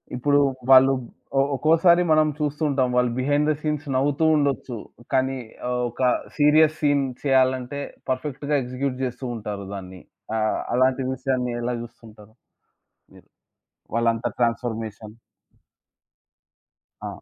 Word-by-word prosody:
ఇప్పుడు 145 +3 +2 0.3
వాళ్ళు 135 +1 +7 0.5
ఒ - - +6
ఒక్కోసారి 165 +4 +4
మనం 155 0 +5
చూస్తూ 150 +1 -2
ఉంటాం. 135 -2 +1
వాళ్ళు 125 -1 +2
బిహైండ్ 145 +3 +1
థ - - +3
సీన్స్ 150 -1 -2
నవ్వుతూ 145 +4 +1
ఉండొచ్చు. 140 -4 -1 0.4
కానీ 130 0 +1 0.3
ఆహ్, 125 0 -1
ఒక 120 - -9 0.4
సీరియస్ 155 +1 +4
సీన్ 145 -2 +2 0.2
చేయాలంటే 130 0 +1 0.3
పర్ఫెక్ట్‌గా 140 +2 -2
ఎగ్జిక్యూట్ 130 +1 -3
జేస్తూ 125 0 -4
ఉంటారు 105 -3 -6
దాన్ని. 95 -2 -8 0.4
ఆహ్, 110 0 0 0.2
అలాంటి 130 +1 +2
విషయాన్ని 130 -1 -2
ఎలా 120 +1 -2
జూస్తుంటారు 110 -2 -13 0.8
మీరు? - - -18 0.7
వాళ్ళంత 115 -1 +1
ట్రాన్స్ఫర్మేషన్? 115 -2 -2 1.9
ఆ! - - -4
130 Hz, 115 wpm, -23 LUFS, 120-145 Hz, 1.9 s, వాళ్ళు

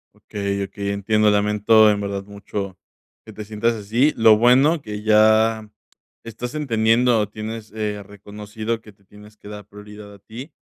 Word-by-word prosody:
Okey, 100 -1 -4
okey, 100 +1 -6
entiendo. 105 +2 +1
Lamento, 105 +1 +3
en 105 0 -2
verdad, 100 -1 -4
mucho 100 -2 -7 0.4
que 110 - -13
te 105 0 -9
sientas 110 +2 -1
así. 115 +8 +1
Lo 110 -1 +5
bueno 135 +8 +3
que 105 -3 -8
ya 110 0 +3 0.5
estás 120 +4 -7
entendiendo, 115 -4 +1
tienes, 110 +1 -8
eh, 105 -1 -4
reconocido 105 +3 -7
que 110 - -15
te 100 0 -31
tienes 105 +2 -17
que 105 - -13
dar 105 -1 -10
prioridad 105 0 -13
a 100 - -14
ti. 115 - -11
105 Hz, 160 wpm, -21 LUFS, 105-110 Hz, 0.5 s, Lo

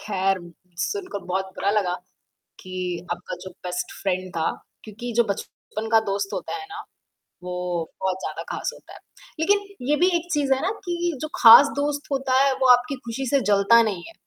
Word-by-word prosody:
ख़ैर, 195 -2 0 0.4
सुनकर 365 - -3
बहुत 190 +1 -2
बुरा 200 - 0
लगा 200 -4 +1 0.7
कि 185 0 -10 0.4
आपका 175 0 -7
जो 185 - -7
बेस्ट 180 0 -3
फ्रेंड 185 -1 -1
था 160 -1 +1 0.3
क्योंकि 220 +3 -7
जो 235 - +6
बचपन 215 +2 -7
का 225 - +7
दोस्त 195 0 -2
होता - - -4
है 400 -1 -6
ना 420 +1 -7 0.6
वो 180 - -6 0.5
बहुत 190 -1 0
ज़्यादा - - -5
ख़ास - - -2
होता - - -15
है, - - -12 0.4
लेकिन 405 +4 +2 0.2
ये 295 - +4
भी 355 +4 +4
एक 345 +1 -4
चीज़ 285 -3 +1
है 265 - -3
ना 375 - +1
कि 345 -1 -1
जो 310 - -2
ख़ास 235 +5 +11
दोस्त 290 0 -2
होता 265 -1 +1
है 275 - +3
वो 260 - +3
आपकी 245 +3 +2
ख़ुशी 245 +3 -3
से 280 - +3
जलता 205 +3 +6
नहीं 200 -6 -2
है। - - -12
230 Hz, 190 wpm, -24 LUFS, 195-290 Hz, 0.7 s, ख़ास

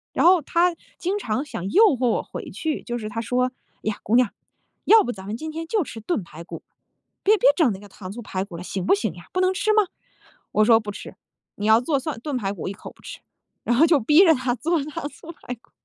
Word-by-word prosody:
然 - - +3
后 360 -2 +6
他 340 +4 +2 0.2
经 380 +4 -1
常 255 - -2
想 190 -8 -5
诱 430 +5 +6
惑 250 0 +1
我 - - 0
回 - - -8
去， 315 -2 -3
就 240 -1 -3
是 215 -2 -5
他 230 0 -3
说： 250 +2 0 0.3
“呀， 215 -1 -2
姑 220 - +1
娘， 250 -4 +4 0.6
要 445 -1 +7
不 245 - -2
咱 190 -3 -10
们 215 +3 -4
今 315 +3 -6
天 325 +1 -5
就 415 -1 +1
吃 230 - -9
炖 220 - -1
排 165 0 -11
骨。 - - -9 0.6
别 425 +2 +5
别 - - +5
整 305 -10 +3
那 190 - -8
个 205 - -13
糖 190 -1 -9
醋 240 +3 -7
排 190 -3 -3
骨 180 -4 -9
了， 180 - -7
行 190 -1 -4
不 - - +4
行 405 - -2
呀？ - - -12
不 370 - +1
能 370 0 +3
吃 430 +3 +1
吗？” 430 -1 +5 0.7
我 215 - +4
说： 225 -1 +6
“不 210 -1 -5
吃， - - -9 0.4
你 205 - -4
要 220 +1 +6
做 280 +1 0
蒜 280 -4 -5
炖 290 -1 -3
排 195 -4 -2
骨 175 - -8
我 - - -2
一 - - -5
口 - - -11
不 - - -23
吃。” - - -9 0.4
然 240 - +1
后 320 - +7
就 315 -4 +4
逼 300 - +6
着 325 - +7
他 255 -1 -1
做 315 +5 0
糖 295 -1 -5
醋 320 +4 -11
排 250 -6 -8
骨。 230 - -32
250 Hz, 280 characters per minute, -23 LUFS, 215-330 Hz, 0.7 s, 要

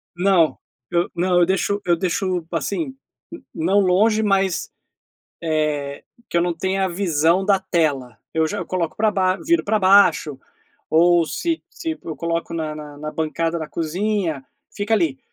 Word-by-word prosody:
Não, 175 -3 +3 0.3
eu 170 0 +1
não, 180 +1 +2
eu 175 - +5
deixo 195 +2 0
eu 175 - +3
deixo, 185 -1 -1
assim, 265 +6 -2 0.6
não 185 +5 +2
longe 205 +4 +3
mas, 195 -3 +1 0.7
eh, 150 -3 -1 0.3
que - - 0
eu - - +3
não 175 0 0
tenha 190 +3 0
a - - 0
visão 170 -1 +1
da 195 -1 +3
tela, 145 -10 -1
eu 160 0 +2
já 205 - -4
eu - - -4
coloco 175 -3 -2
pra 215 0 +2
baixo, 190 -2 0
viro 340 +1 +2
pra 215 +1 +1
baixo 185 -7 +4 0.5
ou 170 +1 +4
se 330 - -2
se 325 -2 -5
eu 160 - -5
coloco 170 0 -3
na 155 -2 -3
na 150 -1 -9
na 150 +1 -5
bancada 165 +2 -1
da 155 - -5
cozinha 170 -2 -2 0.3
fica 205 +2 -1
ali, 165 -10 +1
175 Hz, 165 wpm, -21 LUFS, 160-195 Hz, 0.7 s, eu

